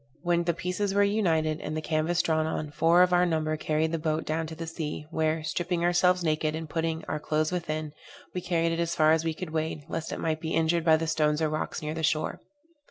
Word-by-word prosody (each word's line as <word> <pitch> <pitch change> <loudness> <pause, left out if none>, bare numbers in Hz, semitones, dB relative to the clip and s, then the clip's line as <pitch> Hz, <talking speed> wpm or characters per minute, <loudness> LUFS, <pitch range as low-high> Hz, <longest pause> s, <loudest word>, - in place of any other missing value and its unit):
When 175 -1 +1
the 170 -1 +1
pieces 195 +3 -2
were 205 - +5
united, 165 -7 +1
and 155 +1 -4
the - - 0
canvas 160 +2 0
drawn 160 -1 +1
on, 155 -1 -3
four 170 +4 +5
of 180 0 +2
our 175 0 +5
number 155 -3 0
carried 155 +1 0
the 165 - -1
boat 155 0 -1
down 160 +1 -1
to 160 - -7
the 165 +1 -5
sea, 160 -2 -5
where, 160 0 0
stripping 170 +2 -1
ourselves 180 +1 +3
naked, 155 -1 0
and 160 0 -5
putting 160 +1 -2
our - - -3
clothes 155 +1 0
within, 155 -4 -3 0.4
we 180 - -3
carried 170 -2 +1
it 165 - -2
as 170 0 0
far 155 -1 +5
as 160 0 +3
we 165 -1 -1
could 175 -1 -6
wade, 155 -1 -2
lest 165 -1 -4
it - - -4
might 155 -1 -1
be 160 - -2
injured 165 +1 +2
by 160 -1 +6
the 165 - -2
stones 155 -2 +1
or 160 -1 +1
rocks 155 0 -3
near 150 0 -2
the 160 - -4
shore. 155 0 0
160 Hz, 240 wpm, -28 LUFS, 155-170 Hz, 0.4 s, by